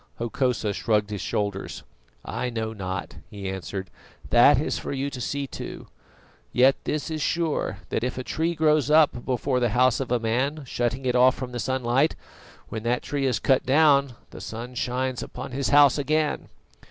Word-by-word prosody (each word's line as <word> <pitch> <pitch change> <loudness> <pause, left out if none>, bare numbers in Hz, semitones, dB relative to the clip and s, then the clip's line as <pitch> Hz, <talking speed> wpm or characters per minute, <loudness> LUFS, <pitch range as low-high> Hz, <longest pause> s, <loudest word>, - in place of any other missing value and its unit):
Hokosa 120 -2 -1
shrugged 105 0 0
his 105 - -4
shoulders. 100 -2 -3 0.4
"I 125 - -3
know 110 -2 -3
not," 95 -3 -5
he 100 -2 -7
answered; 95 0 -5 0.4
"that 125 +3 +6
is 150 - -2
for - - -5
you 140 +1 -2
to 125 - -6
see 140 +4 -2
to. - - -8 0.6
Yet 130 +2 +5
this 155 +1 -2
is 155 -1 -3
sure, 155 - -1
that - - -1
if 125 0 -2
a 130 - -3
tree 165 +5 -1
grows 155 -3 +2
up 150 -5 +4
before 130 0 0
the 120 -1 +1
house 130 -1 +4
of 130 -3 -4
a 125 - +2
man, 130 +7 -1
shutting 120 +1 -2
it 125 - +1
off 125 +1 +5
from 130 -2 -6
the 120 - -5
sunlight, 130 +3 +1 0.5
when 110 - -4
that 120 +2 -1
tree 140 -2 -1
is 125 -4 +1
cut 130 +4 +2
down 140 -1 +4 0.2
the - - -10
sun 120 +3 -7
shines 125 +1 -2
upon - - -7
his 135 +2 -1
house 145 -1 +6
again." 155 +2 0
125 Hz, 180 wpm, -25 LUFS, 115-140 Hz, 0.6 s, that